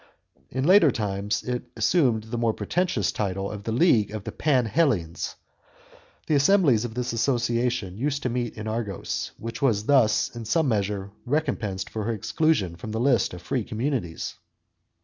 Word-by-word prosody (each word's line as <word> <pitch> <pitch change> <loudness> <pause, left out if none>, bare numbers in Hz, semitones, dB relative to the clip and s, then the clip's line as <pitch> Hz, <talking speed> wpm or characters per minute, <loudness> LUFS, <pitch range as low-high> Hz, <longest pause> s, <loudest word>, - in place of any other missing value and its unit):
In 130 +1 -2
later 175 0 +6
times 105 -2 -2
it 125 -1 -3
assumed 115 -2 +2
the 115 +2 -5
more 115 -2 +1
pretentious 175 - 0
name 100 -3 -1
of 100 +1 -5
the 115 - -1
league 115 - +4
of 105 -1 -6
the - - -5
Panhellenes. 125 - +1 0.9
The - - 0
assemblies 145 - +4
of 115 -2 -5
this 125 -1 -2
association 120 -4 0
used 140 +1 -1
to 125 - 0
meet 120 -1 -3
in 110 0 -5
Argos, 110 -3 -3
which 115 0 -6
was 110 -7 +2
thus 125 -4 +3
in 115 -1 -6
some 160 +7 +2
measure 100 -3 -1
recompensed 125 -9 -1
for 110 -2 -4
her 115 - 0
exclusion 110 - 0
from 110 - -7
the 110 - -1
list 120 -8 +2
of 90 - -11
free 125 -4 -1
communities. 115 - -3
115 Hz, 165 wpm, -25 LUFS, 105-135 Hz, 0.9 s, later